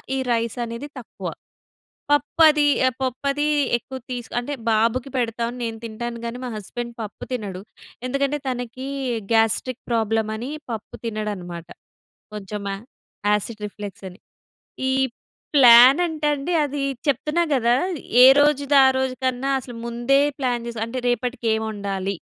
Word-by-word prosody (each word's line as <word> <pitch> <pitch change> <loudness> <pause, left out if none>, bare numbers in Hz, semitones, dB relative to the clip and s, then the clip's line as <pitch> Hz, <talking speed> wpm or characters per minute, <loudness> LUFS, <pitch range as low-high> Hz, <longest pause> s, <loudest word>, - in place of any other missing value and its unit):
ఈ - - -1
రైస్ 230 -1 0
అనేది 235 +5 -6
తక్కువ. 240 - -8 0.8
పప్పది 300 +1 +4 0.2
ఆహ్, 255 - -1
పప్పుది 275 +3 -1 0.3
ఎక్కువ 260 +3 -9
తీసు 245 -2 -5
అంటే 245 +4 -4 0.2
బాబుకి 230 +4 +1
పెడతాను. 235 0 -1
నేను 225 -1 -3
తింటాను 235 +1 -5
గాని, 235 +1 -4
మా - - -4
హస్బెండ్ 235 +4 -6
పప్పు 210 -2 -7
తినడు. 200 -6 -4 0.5
ఎందుకంటే 275 +2 0
తనకి 255 +1 -4 0.5
గాస్ట్రిక్ 225 +3 +1
ప్రాబ్లమ్ 225 -1 +1
అని 240 +4 -5 0.2
పప్పు 220 -2 -6
తినడనమాట. 200 -6 -4 0.7
కొంచెం 205 0 -6
ఆ - - -2 0.6
యాసిడ్ 210 +1 -2
రిఫ్లెక్స్ 205 -1 -9
అని. 180 +3 -16 0.7
ఈ - - +1 0.6
ప్లాన్ 255 +2 +9
అంటే 310 -2 -3
అండి 290 +5 -3
అది 285 0 -3 0.2
చెప్తున్నా 300 +5 +1
గదా! 240 -3 +3 0.5
ఏ - - +11 0.2
రోజుదారోజు 270 -3 +4
కన్నా 260 +1 0
అసలు 245 -1 -10
ముందే 240 +4 +2 0.2
ప్లాన్ 245 -3 -1
జేస్ 235 -1 -6
అంటే 230 +3 -5
రేపటికేమొండాలి? 220 -6 -1
240 Hz, 125 wpm, -23 LUFS, 220-265 Hz, 0.8 s, ఏ